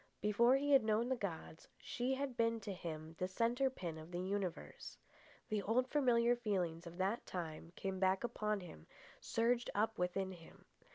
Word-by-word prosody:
Before 235 +5 +4
he 285 +1 +1
had 275 -4 +7
known 220 +3 +2
the 260 - +2
gods, 170 -7 -5
she 255 +2 -1
had 270 -2 -3
been 230 -1 +2
to 200 -1 -4
him 160 -3 -6
the 185 - +1
centre 235 +7 +2
pin 170 -10 -5
of 155 +1 -10
the 175 0 -3
universe. 185 -1 -3 0.5
The 215 -3 0
old 235 +6 +2
familiar 245 -4 +4
feelings 180 -7 -1
of 170 +1 -9
that 195 +5 0
time 165 -2 -5
came 190 -1 -3
back 190 +2 +3
upon 215 -3 -1
him, 160 - -11 0.3
surged 235 +1 +1
up 220 +1 +1
within 185 +2 0
him. 170 -3 -13
205 Hz, 175 wpm, -38 LUFS, 180-235 Hz, 0.5 s, had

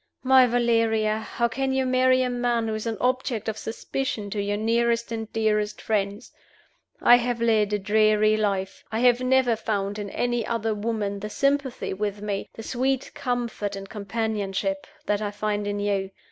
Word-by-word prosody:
My 260 -1 +6
Valeria! 230 -2 +2
how 235 +2 -1
can 265 +3 -2
you 265 0 +1
marry 255 0 +3
a 250 - 0
man 240 -2 0
who 220 - -1
is 215 +1 -3
an 225 -2 -2
object 250 -3 0
of 220 - -1
suspicion 225 -2 -4
to 205 0 -1
your 205 +1 -1
nearest 235 +2 +1
and 225 -1 -4
dearest 210 -1 0
friends? 205 +1 -2 0.7
I 240 - +8
have 245 -1 -1
led 220 -3 +2
a 210 - +2
dreary 215 +1 +3
life. 195 -3 -1
I 220 +1 -1
have 245 0 +4
never 255 -2 +3
found 205 -1 -2
in 205 -1 -4
any 240 +1 -1
other 225 -1 -1
woman 210 -2 -2
the 210 +2 -5
sympathy 275 +1 0
with 205 +1 -3
me, 205 -1 -3
the 225 - -8
sweet 260 +3 -1
comfort 240 -6 -2
and 195 0 -7
companionship, 200 -2 -2 0.2
that 210 0 0
I 210 - -1
find 205 0 -2
in 205 0 -2
you. 200 -1 -1
220 Hz, 175 wpm, -25 LUFS, 205-240 Hz, 0.7 s, I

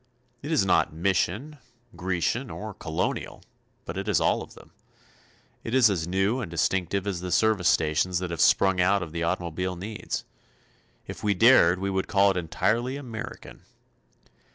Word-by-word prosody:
It 145 - -6
is 150 -11 +3
not 95 - +2
Mission, 100 - -1 0.4
Grecian 95 +8 -1
or 110 0 -7
Colonial, 80 -3 -4 0.4
but - - -5
it - - -5
is - - +2
all - - +1
of - - -11
them. - - -16 0.9
It 115 - -3
is 120 -5 +5
as 85 -4 -2
new 95 +7 0
and 105 - -5
distinctive 90 +3 -1
as 100 -4 -2
the 90 0 -5
service 110 -4 +2
stations 80 +3 +1
that 90 -1 -3
have 85 - -2
sprung 95 -2 +4
out 95 +1 +2
of 80 - -8
the 85 +1 -4
automobile 90 +2 -2
needs. 105 +5 -5 0.8
If - - -9
we 105 -1 +1
dared 95 -5 +6
we 100 +1 -2
would 95 0 -1
call 100 0 +4
it 95 - -3
entirely 115 - -1
American. 120 -4 -8
95 Hz, 165 wpm, -26 LUFS, 90-110 Hz, 0.9 s, dared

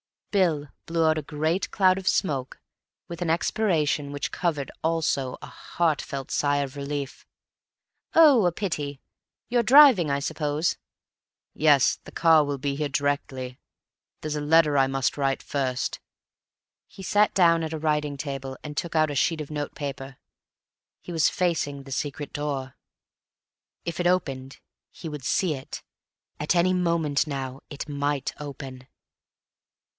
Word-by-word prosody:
Bill 165 -8 +1 0.2
blew 165 -1 +1
out 155 0 +3
a - - -1
great 155 +5 -1
cloud 185 -2 +4
of 190 -1 -6
smoke 135 -9 0 0.5
with 170 0 -7
an 175 - -1
expiration 160 -5 +1
which 145 -1 -3
covered 155 -6 -2
also 160 -5 0
a - - -7
heartfelt 145 -5 -2
sigh 145 -1 +1
of 140 0 -4
relief. 140 -1 -5 0.9
"Oh, 290 - +7
a 175 - +3
pity. 150 -8 -3 0.5
You're 240 0 +3
driving, 245 - +7
I 140 0 +1
suppose?" 150 +2 -1 0.8
"Yes. 150 -4 +4
The - - -12
car 160 -2 +5
will 145 -1 -2
be 140 +1 -2
here 150 +1 -1
directly. 135 -2 -2 0.6
There's 155 -1 -3
a - - -2
letter 150 -1 +4
I 135 -1 +4
must 135 0 -1
write 135 -1 0
first." 130 -3 -2 0.9
He 190 - -12
sat 205 +2 +3
down 170 -3 +5
at 160 0 -3
a - - -2
writing 150 -2 0
table, 135 -2 -5
and 150 -1 -7
took 170 -1 -3
out 155 -1 +3
a - - -4
sheet 160 +3 +1
of 150 - -8
notepaper. 140 -3 -5 0.8
He - - -9
was 160 -3 +3
facing 145 -6 -1
the 135 - -12
secret 145 +1 -4
door; 140 -3 -3 1.1
if 170 0 -4
it 175 - +2
opened 135 -7 -1 0.3
he 165 - -8
would 150 -3 -7
see 180 +1 +1
it. 135 -2 -8 0.6
At 150 +4 0
any 180 +2 +3
moment 170 -5 +1
now 135 -2 -4
it 145 - -6
might 145 -1 -1
open. 135 -3 -8
150 Hz, 150 wpm, -25 LUFS, 140-170 Hz, 1.1 s, Oh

